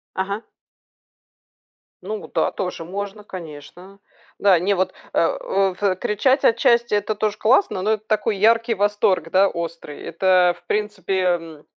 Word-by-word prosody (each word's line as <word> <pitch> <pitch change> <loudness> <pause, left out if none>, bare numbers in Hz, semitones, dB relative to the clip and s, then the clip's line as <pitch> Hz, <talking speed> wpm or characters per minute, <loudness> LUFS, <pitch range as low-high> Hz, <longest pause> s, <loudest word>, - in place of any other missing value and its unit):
Ага. 200 +3 -3 1.6
Ну 435 0 -5
вот - - -13
да, - - +2
тоже 180 -3 -4
можно, 200 +3 -6
конечно. 180 +2 -11 0.4
Да, 195 -4 +5
не 195 +4 +1
вот 185 0 0 0.2
э - - -1
о 195 - 0
в 190 -1 0
кричать, 260 +8 +1
отчасти 235 -1 +3
это 210 +1 0
тоже 210 0 -1
классно, 225 - +2
но 215 +2 +1
это 215 0 -2
такой 215 0 0
яркий 230 +3 +3
восторг, 200 -4 +1
да, 195 +1 +4
острый, 165 -3 -6
это, 180 0 +2
в 175 - -30
принципе, 210 -2 -1
м, 165 -4 -2
195 Hz, 150 wpm, -21 LUFS, 180-215 Hz, 1.6 s, Да